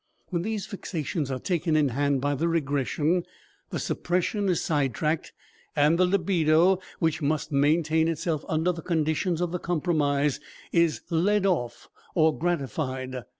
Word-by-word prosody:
When 175 -3 -1
these 215 +1 -3
fixations 160 -6 -4
are 130 - -2
taken 170 +1 0
in 150 -3 +3
hand 140 +1 0
by 145 +1 +1
the 160 +4 0
regression, 155 +2 0 0.5
the - - -3
suppression 185 +3 -1
is 180 - +2
side 140 -6 0
tracked 155 +3 -1 0.4
and 150 +3 +3
the 185 - +5
libido, 180 -1 +3 0.2
which 160 -1 0
must 150 +1 -1
maintain 155 +3 +2
itself 160 -1 -1
under 160 +3 +1
the 170 -1 -6
conditions 165 +1 0
of 175 -1 -1
the 180 - -2
compromise, 150 -5 0 0.3
is 170 -2 +2
led 195 +5 +2
off 155 -11 -1 0.3
or 160 -2 +4
gratified. 130 -6 -2
160 Hz, 150 wpm, -26 LUFS, 145-175 Hz, 0.5 s, the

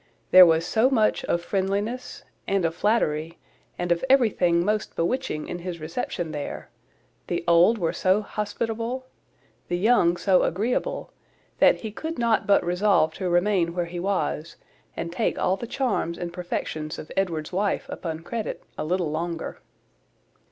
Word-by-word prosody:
There 185 -1 +10
was 165 0 +3
so 225 +7 +3
much 220 -5 +2
of 170 0 0
friendliness, 205 +7 -2 0.2
and 195 -3 +1
of 165 - 0
flattery, 165 -5 0 0.4
and 175 0 -2
of 170 - +1
everything 185 -10 +3
most 215 +1 -1
bewitching 165 -4 -1
in 175 - -5
his 175 -1 -6
reception 160 +1 -4
there; 145 -2 -6 0.6
the 175 - -2
old 170 +7 +5
were 170 -5 -1
so 190 +3 +2
hospitable, 230 +5 -3 0.6
the 175 - -1
young 180 -4 +3
so 190 -1 +3
agreeable, 215 +8 -1 0.5
that - - +5
he 220 - -5
could 320 +9 -5
not 235 -2 +1
but 200 - +4
resolve 180 -2 +2
to 185 -2 -3
remain 175 -1 +2
where 175 -1 0
he 175 +1 -6
was, 170 -4 -2 0.4
and 170 0 -3
take - - 0
all 185 - +1
the 235 +5 -7
charms 230 -10 -1
and 175 -1 -5
perfections 160 -3 -4
of 155 - -9
Edward's 170 -4 -1
wife 200 +2 0
upon 160 -2 -5
credit 225 +6 -5 0.2
a - - -1
little 175 0 -1
longer. 165 +1 -4
180 Hz, 155 wpm, -25 LUFS, 170-210 Hz, 0.6 s, There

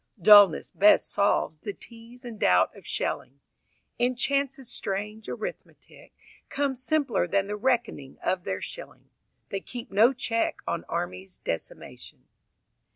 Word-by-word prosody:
Dullness 205 -2 +7
best 205 +2 +4
solves 200 -6 +1
The 205 +4 -6
tease 235 +3 -14
and 230 -3 -8
doubt 90 0 +3
of - - -14
shelling, 140 +2 -3 0.6
And 245 +1 +1
Chance's 275 -1 0
strange 210 +2 -3
arithmetic - - -8 0.4
Comes 275 -3 -1
simpler 260 - +1
than 195 +2 +1
the 205 +1 -4
reckoning 210 - -2
of 185 -1 0
their 95 - -4
shilling. - - -9 0.4
They 195 - -3
keep 240 +2 -9
no 220 +6 +5
check 240 -3 -2
on - - -3
Armies' 90 +1 -5
decimation. 80 - -7
215 Hz, 130 wpm, -26 LUFS, 190-250 Hz, 0.6 s, Dullness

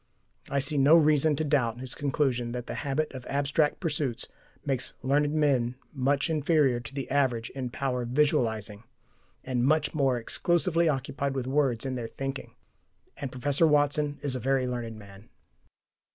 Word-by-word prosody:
I 140 - -1
see 140 +1 +1
no 145 +4 +7
reason 155 -1 +4
to 155 - -1
doubt 125 -6 +1
his 130 0 -5
conclusion 130 -4 -1
that 125 -1 -4
the - - -5
habit 150 +1 -2
of 130 -2 -7
abstract 145 +2 +1
pursuits 145 -8 -2 0.4
makes 135 -3 -1
learned 145 +2 +2
men 135 -6 +1 0.2
much 135 +1 +1
inferior 150 -5 +2
to 120 +2 -9
the 135 -2 -3
average 125 -5 +1
in 130 -2 -4
power 125 0 -2
of 120 - -4
visualizing, 115 -7 0 0.6
and 125 -2 -1
much 150 +2 +2
more 135 -5 +2
exclusively 170 +6 +1
occupied 140 0 -2
with 130 -2 -2
words 135 -3 +1
in 130 - -2
their 120 -3 -4
"thinking." 135 +3 -6 0.6
And 140 -2 -5
Professor 140 +5 +2
Watson 145 0 +2
is 140 -3 0
a - - -2
very 135 +1 +1
learned 120 -3 -4
man. 100 0 -14
135 Hz, 165 wpm, -28 LUFS, 125-145 Hz, 0.6 s, no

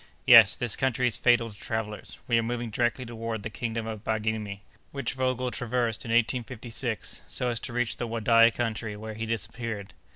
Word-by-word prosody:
"Yes, - - +9
this 120 -4 +1
country 130 -1 +1
is 120 - +1
fatal 120 -2 +3
to 100 - -14
travellers. 110 -2 -4
We 115 -1 +3
are - - +2
moving 120 0 -3
directly 120 +3 0
toward 115 -2 -5
the 110 - -5
kingdom 115 0 -3
of 110 -2 -6
Baghirmi, 110 -2 -2 0.3
which 140 -4 -2
Vogel 130 -1 -1
traversed 120 -1 -1
in - - -6
1856, 120 0 -1
so 125 - -2
as 120 -2 -1
to - - -6
reach 120 -1 -1
the 120 - -3
Wadai 115 0 +5
country, 115 -2 -3
where 110 +1 -7
he 110 +1 -5
disappeared. 115 -2 -4
115 Hz, 185 wpm, -27 LUFS, 110-120 Hz, 0.3 s, Yes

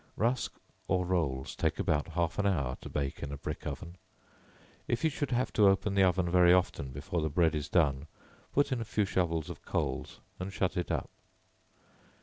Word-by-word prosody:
Rusk, 120 +3 0 0.3
or 90 -1 +1
rolls, 75 -8 -1
take - - 0
about 75 0 +1
half 85 +1 0
an 100 - +2
hour 70 -10 0
to - - -8
bake 70 -2 -3
in 70 - -4
a 70 - -5
brick 70 - -5
oven; 85 +2 -6 0.9
if 120 - -1
you 160 - +3
should 145 -1 -2
have 125 0 0
to 105 -2 +5
open 95 +1 +1
the 100 - +3
oven 95 -1 +3
very 90 0 +6
often 90 -6 +2
before 85 +6 -3
the 80 - 0
bread 80 +1 +3
is 75 -1 -3
done, 75 -4 +2 0.4
put 145 0 +2
in 125 -3 0
a - - 0
few 105 -1 0
shovels 85 -4 0
of - - -8
coals - - -2 0.2
and 95 +2 -4
shut 95 -1 -1
it 90 -2 -2
up. - - -2
90 Hz, 195 wpm, -31 LUFS, 75-100 Hz, 0.9 s, very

